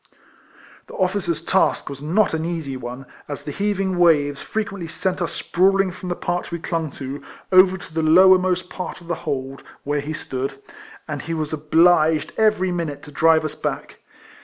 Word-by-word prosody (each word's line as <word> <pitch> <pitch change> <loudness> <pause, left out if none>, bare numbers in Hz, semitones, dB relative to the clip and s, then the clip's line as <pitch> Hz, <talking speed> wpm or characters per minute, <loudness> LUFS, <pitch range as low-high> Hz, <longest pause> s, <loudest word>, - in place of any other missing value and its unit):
The - - -11
officer's 180 -4 -1
task 190 - +2
was 140 -1 -7
not 175 +8 +2
an 160 0 -1
easy 165 -5 -3
one, 125 +1 -7 0.2
as 145 -2 -6
the 145 - -5
heaving 195 -1 -1
waves 145 -5 +3
frequently 200 -5 -4
sent 185 +3 -2
us 175 - -1
sprawling 195 +1 +2
from 185 +1 -8
the 175 - -1
part 175 0 -3
we 170 - -2
clung 165 -1 -3
to, 135 +1 -6 0.3
over 185 0 +6
to 175 - -12
the 160 - 0
lower 185 +4 +7
most 185 0 -1
part 180 0 -6
of 170 - -15
the 175 - -1 0.2
hold, 135 -1 -4 0.2
where 145 0 -1
he 150 +2 -5
stood, 135 -2 -4 0.5
and 150 -3 -4
he 165 - -4
was 155 -1 -3
obliged 160 0 +3
every 215 -4 +2
minute 165 -5 -3
to 150 - -11
drive 160 +2 +3
us 155 - -3
back. - - -5
165 Hz, 185 wpm, -22 LUFS, 150-185 Hz, 0.5 s, lower